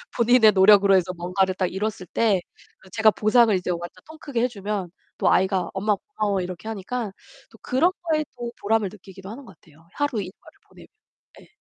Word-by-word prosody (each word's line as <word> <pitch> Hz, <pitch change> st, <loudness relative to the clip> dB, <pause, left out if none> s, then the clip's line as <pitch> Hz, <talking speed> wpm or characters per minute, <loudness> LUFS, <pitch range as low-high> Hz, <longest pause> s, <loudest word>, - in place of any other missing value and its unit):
본인의 235 Hz, -3 st, +5 dB
노력으로 195 Hz, 0 st, +6 dB
해서 180 Hz, -1 st, +1 dB
뭔가를 185 Hz, +2 st, 0 dB
딱 185 Hz, -, 0 dB
이뤘을 205 Hz, -2 st, -4 dB
때 205 Hz, -6 st, +2 dB, 0.4 s
그 190 Hz, -, -19 dB
제가 220 Hz, +1 st, +4 dB
보상을 220 Hz, +1 st, +3 dB
이제 180 Hz, 0 st, -2 dB
완전 175 Hz, +1 st, -6 dB
통 315 Hz, 0 st, -13 dB
크게 250 Hz, -5 st, -3 dB
해주면 205 Hz, -6 st, -3 dB, 0.3 s
또 -, -, +2 dB
아이가 190 Hz, -1 st, +1 dB
"엄마 205 Hz, +2 st, 0 dB
고마워." 205 Hz, -, -3 dB
이렇게 180 Hz, +4 st, -7 dB
하니까 220 Hz, +1 st, -4 dB, 0.4 s
또 -, -, -18 dB
그런 315 Hz, +9 st, +1 dB
거에 310 Hz, -2 st, 0 dB
또 240 Hz, -1 st, -5 dB
보람을 210 Hz, -1 st, +1 dB
느끼기도 190 Hz, -1 st, -13 dB
하는 255 Hz, +4 st, -9 dB
것 190 Hz, -6 st, -16 dB
같아요. 160 Hz, +1 st, -23 dB
하루 290 Hz, -7 st, -1 dB
일과를 185 Hz, +1 st, -12 dB
보내면. -, -, -16 dB, 0.5 s
예. -, -, -19 dB
205 Hz, 395 characters per minute, -23 LUFS, 185-230 Hz, 0.5 s, 노력으로